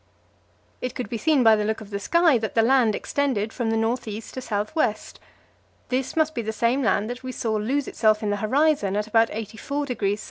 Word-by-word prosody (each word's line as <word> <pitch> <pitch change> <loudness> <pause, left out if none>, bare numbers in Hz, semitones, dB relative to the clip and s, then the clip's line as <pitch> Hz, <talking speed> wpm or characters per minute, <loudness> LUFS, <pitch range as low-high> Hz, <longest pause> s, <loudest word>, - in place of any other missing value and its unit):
It 250 0 -4
could 245 -5 -4
be 230 - -4
seen 300 -2 +3
by 225 -1 +7
the 210 - -1
look 220 +1 -1
of 215 -1 -12
the 200 - -3
sky 330 - +3
that 220 -1 -4
the 225 - +4
land 240 -3 +3
extended 240 -7 -1
from 235 -3 -2
north 225 +2 0
east 215 +1 -7
to 260 - -5
south 210 +3 -3
west. 220 -9 -1 0.7
This 255 0 -2
must 315 -1 +2
be 235 - -2
the 220 -1 -3
same 235 +5 +1
land 215 -3 +1
that 245 +1 -7
we 255 0 -5
saw 225 -3 -2
lose 250 +7 -1
itself 215 -1 +2
in 205 - 0
the 205 - 0
horizon 255 -2 +1
in 210 - +1
about 225 +1 +3
84°S. 220 0 -3
225 Hz, 215 wpm, -24 LUFS, 215-260 Hz, 0.7 s, by